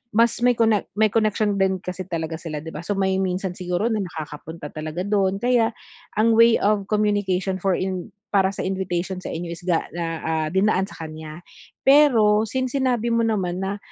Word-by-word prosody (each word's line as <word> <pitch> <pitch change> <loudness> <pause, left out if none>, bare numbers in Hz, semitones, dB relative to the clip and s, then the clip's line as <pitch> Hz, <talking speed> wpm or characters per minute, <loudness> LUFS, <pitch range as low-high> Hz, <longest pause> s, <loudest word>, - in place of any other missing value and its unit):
mas 230 +1 +3
may 245 0 +4
connect 220 -3 +2
may 215 -1 +3
connection 215 -2 +1
din 190 0 +2
kasi 185 0 -5
talaga 165 -2 -3
sila 155 -3 -6
'di 160 - -7
ba, 150 - -7
so 195 +5 -3
may 190 -1 +1
minsan 185 0 -1
siguro 180 +5 -2
na 220 - 0
nakakapunta 160 -3 -7
talaga 155 +3 -4
dun, 200 +1 0
kaya 235 -2 +2 0.4
ang 220 +2 +3
way 230 +1 +6
of 205 -1 +2
communication 205 -3 0
for 190 0 +1
in 185 -2 -3 0.2
para 195 -2 +4
sa - - -4
invitation 190 -1 -2
sa - - -8
inyo 170 +1 -4
is 170 - -7
ga 175 -3 +2
na 170 0 -3 0.2
ah, 160 -1 0
dinaan 190 0 +2
sa 165 - -9
kanya. 155 +1 -9 0.4
Pero 230 -7 +5
since 255 +3 -2
sinabi 245 -3 +1
mo 230 0 +2
naman 190 -6 -1
na 195 +1 -2
190 Hz, 190 wpm, -23 LUFS, 175-215 Hz, 0.4 s, way